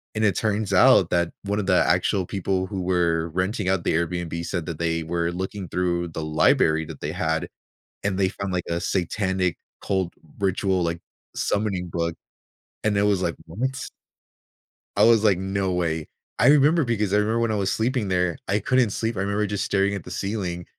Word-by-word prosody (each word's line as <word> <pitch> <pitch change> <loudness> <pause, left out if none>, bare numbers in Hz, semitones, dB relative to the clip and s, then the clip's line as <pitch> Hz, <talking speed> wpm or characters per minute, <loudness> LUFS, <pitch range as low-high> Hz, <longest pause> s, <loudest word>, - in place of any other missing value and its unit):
And 110 0 +1
it 100 -4 +2
turns 105 -2 0
out 95 -3 +6
that 85 -1 +1
one 100 +1 -1
of 100 - -3
the 90 - +4
actual 95 -2 +2
people 95 0 -1
who 95 -3 -4
were 85 -2 +1
renting 95 +3 -1
out 95 -3 +1
the - - +2
Airbnb 85 0 -2
said 85 -4 -3
that 85 -3 -5
they 80 -1 0
were 85 +1 -1
looking 95 +1 -5
through 85 -1 -1
the 80 0 -5
library 80 +1 +3
that 80 -2 -9
they 75 +2 -3
had, 80 -2 -1 0.6
and 100 -2 0
they 95 -1 +2
found, 100 -2 -5
like, 90 -1 -1
a 85 0 -1
satanic 95 -1 0 0.3
cold 95 -3 -1 0.2
ritual, 95 -1 +1
like, 85 0 -2 0.4
summoning 100 -4 -1
book. 85 0 -1 0.7
And 105 -2 +2
it - - +3
was 100 -2 +2
like, 85 - -1
"What?" 130 +8 -3 1.1
I 100 - +4
was 115 -1 +6
like, 100 -4 +4
"No 95 0 -1
way." 80 -3 -1 0.3
I - - +5
remember 150 +3 +5
because 105 -4 0
I 105 - +5
remember 110 +2 +1
when 115 -1 +1
I 110 - 0
was 100 -2 0
sleeping 115 -2 0
there, 90 -2 0
I 100 +2 +1
couldn't 125 +1 +2
sleep. 115 0 -2
I - - -1
remember 100 +1 0
just 100 0 -2
staring 100 0 +1
at 100 - -4
the 90 - -10
ceiling 90 -3 -3
95 Hz, 195 wpm, -24 LUFS, 85-105 Hz, 1.1 s, out